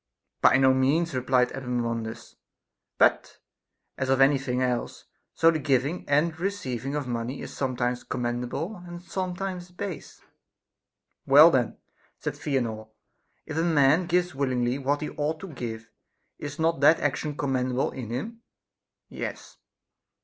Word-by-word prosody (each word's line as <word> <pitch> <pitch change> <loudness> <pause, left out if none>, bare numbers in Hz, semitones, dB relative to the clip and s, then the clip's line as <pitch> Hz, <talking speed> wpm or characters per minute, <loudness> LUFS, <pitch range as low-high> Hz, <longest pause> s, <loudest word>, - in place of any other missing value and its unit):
By - - +6
no 130 0 +5
means, 145 +6 +2
replied 125 -1 +2
Epaminondas; 120 -3 -4 0.6
but, - - +2 0.6
as 130 - -1
of 135 0 +3
any 135 +1 +5
thing 125 -2 -2
else, 125 -2 -2 0.3
so 165 0 +5
the 160 - -1
giving 140 +4 0
and 155 +3 +2
receiving 145 - -3
of 145 -2 -2
money 120 +2 -3
is - - -8
sometimes 125 -2 -1
commendable 125 - -3
and 175 0 -10
some 185 -1 -3
times 180 -1 -5
base. 180 -1 -7 1.1
Well 150 +5 +9
then, 125 -5 0 0.4
said - - -3
Theanor, 115 -6 -2 0.6
if 155 - -5
a - - +2
man 160 +1 +4
gives 180 0 +1
willingly 130 -2 0
what 140 +2 0
he 150 - -4
ought 155 +2 -2
to 195 - -7
give, 115 -3 -6 0.5
is 145 0 -6
not 165 -1 +1
that 150 +4 +6
action 145 +1 -2
com 140 -2 -1
mendable 130 0 0
in 125 -4 -6
him? 220 - -5 0.7
Yes. - - -7
135 Hz, 140 wpm, -26 LUFS, 125-165 Hz, 1.1 s, Well